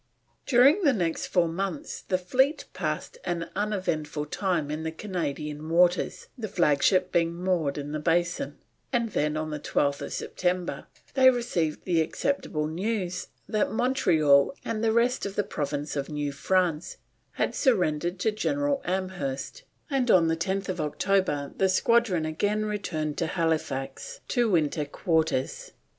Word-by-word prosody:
During 275 Hz, +9 st, +6 dB
the 285 Hz, -4 st, +5 dB
next 170 Hz, -7 st, -1 dB
four 175 Hz, -2 st, +2 dB
months 175 Hz, -1 st, -4 dB
the 185 Hz, -, 0 dB
fleet 260 Hz, -, +1 dB
passed 485 Hz, -, -3 dB
an 170 Hz, -1 st, -3 dB
uneventful 165 Hz, -8 st, -1 dB
time 165 Hz, -2 st, -1 dB
in 155 Hz, +1 st, -3 dB
the 160 Hz, 0 st, -3 dB
Canadian 155 Hz, -4 st, -4 dB
waters, 175 Hz, +2 st, +2 dB
the 230 Hz, -5 st, -4 dB
flagship 180 Hz, 0 st, +2 dB
being 170 Hz, 0 st, +1 dB
moored 175 Hz, -5 st, 0 dB
in 145 Hz, 0 st, -5 dB
the 155 Hz, -, -2 dB
Basin, 170 Hz, -, 0 dB, 0.3 s
and 235 Hz, -3 st, +1 dB
then 150 Hz, -2 st, 0 dB
on 155 Hz, 0 st, -3 dB
the 150 Hz, -, -3 dB
12th 140 Hz, -1 st, -1 dB
September 180 Hz, -1 st, -2 dB, 0.3 s
they 260 Hz, -1 st, +7 dB
received 185 Hz, -11 st, -1 dB
the 170 Hz, -3 st, +2 dB
acceptable 160 Hz, -, -1 dB
news 185 Hz, +2 st, -2 dB, 0.2 s
that 215 Hz, -2 st, 0 dB
Montreal 175 Hz, -, +3 dB
and 225 Hz, -1 st, -2 dB
the 225 Hz, -, +3 dB
rest 235 Hz, +1 st, +2 dB
of 200 Hz, -, -7 dB
the 205 Hz, -, +1 dB
province 145 Hz, -5 st, -3 dB
of 140 Hz, -1 st, -2 dB
New 145 Hz, -1 st, -2 dB
France 175 Hz, +2 st, 0 dB, 0.4 s
had -, -, -1 dB
surrendered 175 Hz, -, +1 dB
to 220 Hz, -, +2 dB
General 285 Hz, +6 st, 0 dB
Amherst, 185 Hz, -, -3 dB, 0.3 s
and 270 Hz, -5 st, 0 dB
on 175 Hz, -6 st, +6 dB
10th 185 Hz, +3 st, -1 dB
October 150 Hz, -2 st, 0 dB
the 190 Hz, -, +3 dB
squadron 190 Hz, -4 st, +3 dB
again 205 Hz, +7 st, 0 dB
returned 170 Hz, -8 st, -3 dB
to 165 Hz, -, 0 dB
Halifax 155 Hz, -6 st, -2 dB
to 240 Hz, -3 st, +2 dB
winter 155 Hz, -4 st, +1 dB
quarters. 160 Hz, -3 st, -1 dB
175 Hz, 145 wpm, -27 LUFS, 155-210 Hz, 0.4 s, they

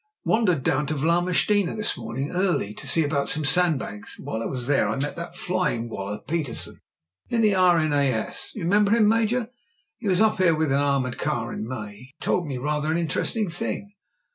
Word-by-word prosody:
"Wandered 185 Hz, -, +2 dB
down 135 Hz, +3 st, +1 dB
to 155 Hz, -, -1 dB
Vlamertinghe 175 Hz, +5 st, +2 dB
this 215 Hz, -, -1 dB
morning 135 Hz, +4 st, -4 dB
early 180 Hz, -, 0 dB
to -, -, -7 dB
see 165 Hz, -, +4 dB
about 145 Hz, -1 st, 0 dB
some 150 Hz, 0 st, +2 dB
sandbags, 145 Hz, -, +1 dB
and -, -, -12 dB
while 110 Hz, -, -3 dB
I -, -, -2 dB
was 125 Hz, -2 st, -4 dB
there 140 Hz, +1 st, +2 dB
I -, -, -1 dB
met 145 Hz, +2 st, -3 dB
that 170 Hz, 0 st, -7 dB
flying 145 Hz, -11 st, -1 dB
wallah 100 Hz, +1 st, -5 dB
Petersen 155 Hz, -7 st, -2 dB, 0.5 s
in 230 Hz, -, +1 dB
the 210 Hz, -2 st, +4 dB
R.N.A.S. 155 Hz, -, +2 dB
Do -, -, -12 dB
you -, -, -2 dB
remember 205 Hz, +3 st, +3 dB
him, 225 Hz, -2 st, +4 dB
Major? 225 Hz, +2 st, +1 dB, 0.5 s
He 225 Hz, -, -5 dB
was 185 Hz, -2 st, +3 dB
up 215 Hz, -2 st, +3 dB
here 170 Hz, -3 st, +4 dB
with 155 Hz, -2 st, 0 dB
an 140 Hz, -, +3 dB
armoured 140 Hz, -3 st, 0 dB
car 115 Hz, -1 st, -2 dB
in 110 Hz, -, -5 dB
May. 110 Hz, -5 st, -5 dB
He 125 Hz, +4 st, -14 dB
told 175 Hz, -3 st, 0 dB
me 135 Hz, -3 st, -3 dB
rather 150 Hz, +3 st, -1 dB
an 165 Hz, -, +1 dB
inter 170 Hz, -2 st, -1 dB
esting 210 Hz, -7 st, -1 dB
thing." 200 Hz, +3 st, -4 dB
155 Hz, 205 wpm, -24 LUFS, 135-185 Hz, 0.5 s, see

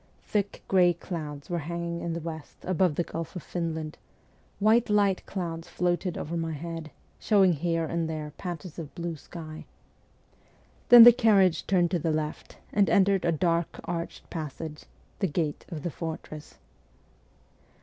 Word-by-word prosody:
Thick 205 Hz, -1 st, -2 dB
grey 180 Hz, -2 st, +5 dB
clouds 150 Hz, -5 st, -6 dB
were 175 Hz, -1 st, -2 dB
hanging 170 Hz, +2 st, -4 dB
in 170 Hz, -, -2 dB
the 170 Hz, -, -3 dB
west 160 Hz, -2 st, -7 dB
above 180 Hz, -3 st, +1 dB
the 175 Hz, -, +1 dB
Gulf 165 Hz, +1 st, -6 dB
of 180 Hz, -, -6 dB
Finland, 160 Hz, -3 st, -4 dB, 0.6 s
while 220 Hz, +3 st, +5 dB
light 200 Hz, -2 st, +2 dB
clouds 170 Hz, -3 st, -4 dB
floated 175 Hz, +1 st, -1 dB
over 165 Hz, +3 st, -4 dB
my 165 Hz, -1 st, -2 dB
head, 165 Hz, +1 st, -6 dB, 0.3 s
showing 195 Hz, -4 st, +4 dB
here 165 Hz, +1 st, 0 dB
and 165 Hz, 0 st, -2 dB
there 155 Hz, -2 st, -5 dB
patches 175 Hz, -1 st, -6 dB
of 155 Hz, -3 st, -8 dB
blue 170 Hz, -1 st, -3 dB
sky. 155 Hz, +1 st, -9 dB, 1.3 s
Then 240 Hz, -1 st, +12 dB
the 240 Hz, +1 st, +11 dB
carriage 200 Hz, -7 st, +3 dB
turned 175 Hz, -3 st, +3 dB
to 175 Hz, -, +1 dB
the 165 Hz, +1 st, -1 dB
left 155 Hz, -1 st, -3 dB, 0.2 s
and 200 Hz, -1 st, +3 dB
entered 195 Hz, -2 st, +3 dB
a 170 Hz, -, +3 dB
dark 165 Hz, +1 st, 0 dB
arched 170 Hz, -1 st, -5 dB
passage, 155 Hz, -1 st, -6 dB, 0.3 s
the 195 Hz, -, +2 dB
gate 155 Hz, -1 st, -2 dB
of 155 Hz, -4 st, -6 dB
the 175 Hz, -, -2 dB
fortress. 155 Hz, -2 st, -7 dB
170 Hz, 155 wpm, -28 LUFS, 160-185 Hz, 1.3 s, Then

